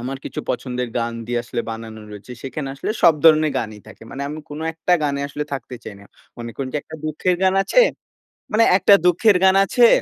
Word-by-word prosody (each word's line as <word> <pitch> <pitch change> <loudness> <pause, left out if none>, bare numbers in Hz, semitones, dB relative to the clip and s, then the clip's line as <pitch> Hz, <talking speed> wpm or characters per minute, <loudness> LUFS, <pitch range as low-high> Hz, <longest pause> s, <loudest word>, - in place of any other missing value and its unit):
আমার 130 +3 -4
কিছু - - -5
পছন্দের 125 0 -3
গান 115 0 -2
দিয়ে 120 0 -1
আসলে 115 0 -3
বানানো 110 -1 -8
রয়েছে, 105 +4 -10
সেখানে 135 +1 -5
আসলে 140 - -4
সব 170 -3 +7
ধরণের 155 -2 +5
গানই 110 -2 -6
থাকে। - - -14
মানে 140 - -6
আমি 150 +2 -6
কোন 145 +1 -7
একটা 165 +2 -1
গানে 140 -1 -1
আসলে 150 +1 -4
থাকতে 130 -2 -5
চাই 105 - -8
না। - - -15 0.3
মনে 120 0 -6
করুন 135 -1 -4
যে - - +1
একটা 160 - -10
দুঃখের 155 +4 0
গান 190 0 +3
আছে 195 - +3 0.7
মানে 225 +1 +4
একটা 200 - +5
দুঃখের 180 +3 +4
গান 190 0 +5
আছে। 240 +4 +5
140 Hz, 210 wpm, -21 LUFS, 120-170 Hz, 0.7 s, সব